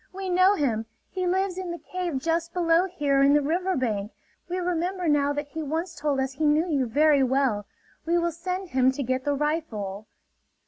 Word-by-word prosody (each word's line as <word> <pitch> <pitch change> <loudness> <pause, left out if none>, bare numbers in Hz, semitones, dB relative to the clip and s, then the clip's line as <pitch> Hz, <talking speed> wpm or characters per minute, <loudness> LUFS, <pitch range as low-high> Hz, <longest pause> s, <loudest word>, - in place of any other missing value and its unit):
We 380 0 -5
know 370 +3 +5
him! 225 - -1 0.2
He 370 -1 -2
lives 375 0 0
in 370 -1 -5
the 345 - -4
cave 355 -4 -4
just 335 +4 -1
below 340 0 +3
here 290 -6 +1
in 280 +1 +5
the 295 - +4
river 360 +5 0
bank. 215 -5 -1 0.4
We 360 - -2
remember 360 0 -1
now 290 -1 +3
that 290 0 -4
he 320 +2 -5
once 325 +4 -3
told 290 -4 -1
us 265 0 -1
he 305 +4 -1
knew 305 +4 +3
you 280 -6 0
very 290 +4 +4
well. 255 -6 +1 0.4
We 340 +1 +3
will 340 0 +1
send 365 +3 -4
him 260 -2 +3
to 280 - -3
get 255 +2 -2
the 290 -1 +1
rifle." 220 -10 -3
310 Hz, 200 wpm, -26 LUFS, 270-355 Hz, 0.4 s, know